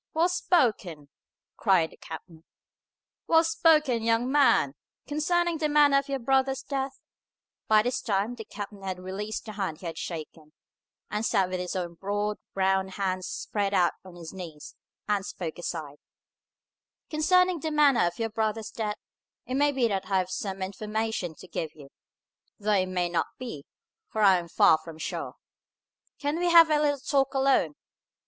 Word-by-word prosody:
"Well 335 +3 +3
spoken!" 215 - +1 0.5
cried 185 -6 +3
the - - -17
captain. 160 0 -10 0.8
"Well 325 0 +5
spoken, 310 - +3
young 230 +3 +1
man! 275 - +4 0.3
Concerning 335 +3 0
the 305 -1 +1
manner 290 -2 +5
of 275 +1 -8
your 275 - 0
brother's 265 +1 +1
death," 270 -1 -3 0.7
by 215 -1 +5
this 245 +2 -1
time 205 +2 0
the 235 -2 -8
captain 205 -1 -8
had 190 -1 -4
released 195 +4 -5
the 220 - -6
hand 195 -7 -3
he - - -9
had 165 - -5
shaken, 155 -2 -7 0.6
and 210 +1 -1
sat 190 -4 +2
with 185 - -2
his 180 0 -4
own 175 -2 -3
broad, 205 +3 -2 0.2
brown 190 0 +2
hands 185 -1 -2
spread 205 - -2
out 175 -2 +3
on 185 -2 -13
his 170 -1 -9
knees, 165 -6 -9 0.3
and 205 -2 +1
spoke 175 -4 -6
aside, 155 -4 -5 1.1
"concerning 365 +3 +3
the 315 - -2
manner 290 - +4
of 175 - -5
your 225 -1 -2
brother's 220 0 -2
death, 210 -2 -3 0.5
it 255 - -5
may 290 +2 +3
be 260 -4 +2
that 195 -3 -2
I 195 - +2
have 185 0 -1
some 190 0 -3
information 210 -2 -3
to 185 - -13
give 160 -3 -4
you; 145 -3 -13 0.7
though 210 0 -1
it 190 -2 +3
may 180 -1 0
not 175 -1 0
be, 195 - -7 0.4
for 215 - -1
I 190 -3 +6
am 170 - -8
far 160 -1 +5
from 160 0 -11
sure. - - -5 0.8
Can 290 +3 -2
we 350 0 +2
have 335 -2 +8
a 300 - +4
little 290 -1 +2
talk 275 0 0
alone?" 265 - +2
210 Hz, 170 wpm, -27 LUFS, 185-275 Hz, 1.1 s, have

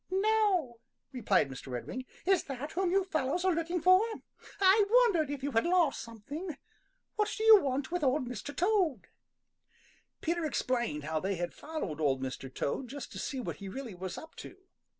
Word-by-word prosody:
"No," 385 - +1 0.3
replied 210 - +2
Mr. 135 0 -9
Redwing. 130 - -5 0.2
"Is 380 -2 +3
that 275 +2 -5
whom 370 +1 0
you 390 +2 +3
fellows 330 0 -1
are 375 - +4
looking 335 +2 -1
for? 370 +3 +6 0.6
I 395 +2 +6
wondered 430 - +4
if 285 -2 -5
you 285 - -1
had 225 -2 +2
lost 345 -5 +2
something. 280 - -7 0.6
What 425 0 +1
do 440 - -2
you 440 -2 +9
want 270 +2 -2
with 355 -2 -1
Old 260 -1 +1
Mr. 250 +4 -6
Toad?" 350 - +1 1.1
Peter 340 +1 -1
explained 240 - -1
how 155 +1 -1
they 195 +4 -1
had 175 0 -3
followed 290 - -5
Old 135 -3 +2
Mr. 130 0 -5
Toad 195 - -2
just 275 +3 -7
to - - -7
see 270 - -3
what 250 - -4
he 200 -1 -7
really 250 0 -6
was 185 0 -6
up 320 - -10
to. - - -10
285 Hz, 180 wpm, -31 LUFS, 230-365 Hz, 1.1 s, you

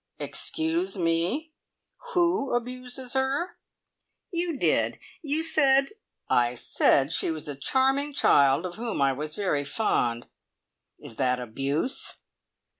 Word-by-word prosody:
"Excuse 325 - -1
me. 180 - 0 0.6
Who 340 -7 +2
abuses 250 +1 -4
her?" 270 +6 -1 0.7
"You 340 -3 0
did. - - +1 0.2
You 310 0 -1
said 275 -4 +4 0.2
" - - -58
"I 120 0 +2
said 135 +4 +2
she - - +1
was 160 -2 -5
a 145 - -4
charming 270 - +1
child 140 - +4
of 175 +1 -6
whom 230 -5 -3
I 135 -1 +3
was 150 +3 -6
very 165 -8 0
fond. 120 - 0 0.7
Is 115 - -11
that 125 -1 +1
abuse?" 135 - -2
240 Hz, 120 wpm, -26 LUFS, -, 0.7 s, said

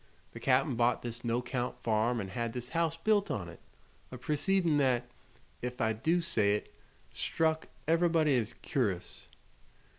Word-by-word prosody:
The - - -9
Cap'n 135 +2 +3
bought 120 +1 +2
this 120 0 -5
no'count 120 +1 -1
farm 115 +2 +2
an' 95 -3 -4
had 115 +3 -3
this 125 -1 -5
house 165 +1 0
built 205 +3 +2
on 90 -5 -2
it 85 - -11 0.5
a 130 - -6
proceedin' 165 +4 +1
that, 125 -3 +2 0.5
ef 125 0 -4
I 110 -2 +2
do 165 +11 +1
say 105 -10 +2
it, 105 - -6 0.4
struck 160 0 0 0.2
ev'rybody 165 -3 +3
as 115 +1 -4
cur'ous." 95 -10 -2
125 Hz, 150 wpm, -31 LUFS, 115-160 Hz, 0.5 s, Cap'n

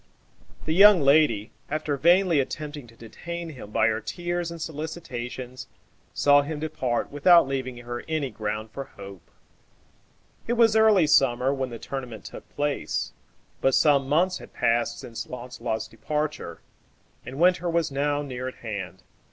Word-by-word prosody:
The 155 - 0
young 200 0 +8
lady, 135 -7 +3 0.2
after 155 -1 -1
vainly 170 +2 +4
attempting 145 0 -4
to 115 - -18
detain 170 +10 -7
him 130 -9 -10
by 110 - +2
her 110 0 +1
tears 175 - -3
and 170 0 -8
solicitations, 130 -6 -6 0.4
saw 145 0 +4
him 150 +1 -5
depart 130 -6 -2
without 170 +2 +5
leaving 130 -2 -3
her 120 0 -6
any 155 -5 -2
ground 110 0 -4
for 135 +3 -6
hope. 100 -6 -12 1.2
It 235 - +1
was 230 -2 +4
early 215 -6 +5
summer 135 -2 +3
when 135 -2 -3
the 120 - -7
tournament 125 -4 -7
took - - -10
place; 145 -1 -2 0.5
but 135 -1 +3
some 140 -3 +3
months 180 +5 +2
had - - -13
passed 120 0 +1
since 115 -2 -7
Launcelot's 120 -3 -5
departure, 150 +7 -4 0.6
and 130 +3 -8
winter 180 0 +3
was 165 -3 0
now 145 +1 0
near 130 -2 -5
at 130 - -6
hand. 95 -4 -6
140 Hz, 150 wpm, -25 LUFS, 120-160 Hz, 1.2 s, young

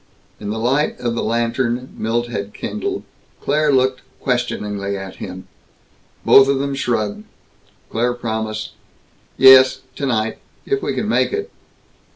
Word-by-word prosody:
In 105 - -5
the 110 - -2
light 135 +7 0
of 120 -1 -1
the 115 - -2
lantern 120 +2 -1
Milt 115 +2 -1
had 105 -3 -5
kindled, 385 - -4 0.4
Claire 150 +1 +1
looked 130 -1 +2 0.2
questioningly 105 -5 -2
at 95 -1 -8
him. 95 +1 -8 0.8
Both 135 0 +8
of 140 0 +2
them 140 +1 -2
shrugged. 110 -6 -1 0.7
Claire 120 +2 0
promised, 110 -2 -3 0.7
"Yes. 130 0 +8
Tonight. 115 -6 -1 0.3
If 410 0 0
we - - -2
can - - -2
make - - +2
it." 420 +2 -3
120 Hz, 135 wpm, -19 LUFS, 110-135 Hz, 0.8 s, Both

